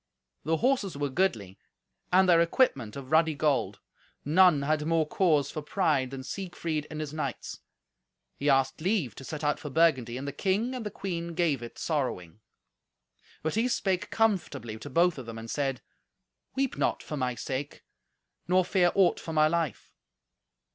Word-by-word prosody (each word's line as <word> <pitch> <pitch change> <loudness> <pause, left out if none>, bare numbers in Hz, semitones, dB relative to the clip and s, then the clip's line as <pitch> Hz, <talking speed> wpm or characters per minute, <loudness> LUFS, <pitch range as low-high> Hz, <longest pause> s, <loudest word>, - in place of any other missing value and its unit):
The 160 +1 +1
horses 230 - 0
were 145 0 -1
goodly, 115 - -1 0.5
and 185 +1 +5
their 170 -2 +6
equipment 155 - +1
of 135 0 -8
ruddy 160 -1 +4
gold. 145 -1 0 0.5
None 165 -1 +5
had 150 +1 0
more 165 -1 +2
cause 150 -5 +2
for 155 - -4
pride 150 -5 +1
than 130 0 -7
Siegfried 165 -2 -4
and 155 - -6
his 155 -1 -5
knights. 140 -5 -4 0.8
He 145 - -1
asked 135 +1 +2
leave 180 - 0
to 135 - -11
set 155 +3 -6
out 150 0 +1
for 150 - -6
Burgundy, 130 -6 +2
and 135 +2 -5
the - - -2
king 205 - 0
and 250 -3 -4
the 210 - -3
queen 170 -4 -5
gave 160 -7 +1
it 120 - -9
sorrowing. 115 - -3 1.0
But 160 - -1
he 225 +3 +1
spake 195 -5 -1
comfortably 145 - 0
to - - -8
both 170 -2 +2
of 125 - -9
them, 115 -1 -7
and 115 0 -7
said, 135 -3 -1 0.7
"Weep 270 -1 -1
not - - 0
for 150 - -5
my 125 -3 -1
sake; 135 +4 -5 0.6
nor 185 0 +3
fear 180 -2 +3
aught 190 -3 +4
for 160 - -6
my 155 0 +5
life." 165 -6 -2
155 Hz, 170 wpm, -28 LUFS, 135-180 Hz, 1.0 s, their